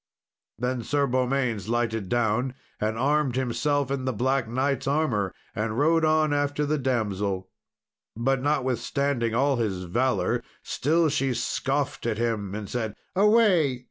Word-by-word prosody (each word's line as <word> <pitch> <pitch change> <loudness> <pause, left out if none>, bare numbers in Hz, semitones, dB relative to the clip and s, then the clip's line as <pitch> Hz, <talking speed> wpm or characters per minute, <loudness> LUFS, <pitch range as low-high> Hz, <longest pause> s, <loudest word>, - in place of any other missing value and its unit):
Then 125 +2 -1
Sir 140 +4 +1
Beaumains 125 -5 0
lighted 115 -4 -1
down 120 +3 +1 0.2
and 110 +1 -1
armed 140 0 +1
himself 135 +2 0
in 135 -2 -2
the 130 - +1
Black 130 +2 0
Knight's 130 +3 -1
armour, 130 - +1 0.2
and 110 +1 -2
rode 160 +3 +3
on 155 -1 +3
after 145 +1 0
the 150 +1 0
damsel. 100 -7 -1 0.7
But 130 +2 +1
notwithstanding 130 -3 0
all 135 +2 +2
his 100 -6 -1
valour, 120 +9 0 0.2
still 160 +4 +1
she 135 -3 0
scoffed 135 -1 -1
at 110 -2 -1
him, 110 -4 -1
and 105 -1 -5
said, 110 -3 -3 0.2
"Away! 195 - +4
130 Hz, 140 wpm, -26 LUFS, 115-145 Hz, 0.7 s, Away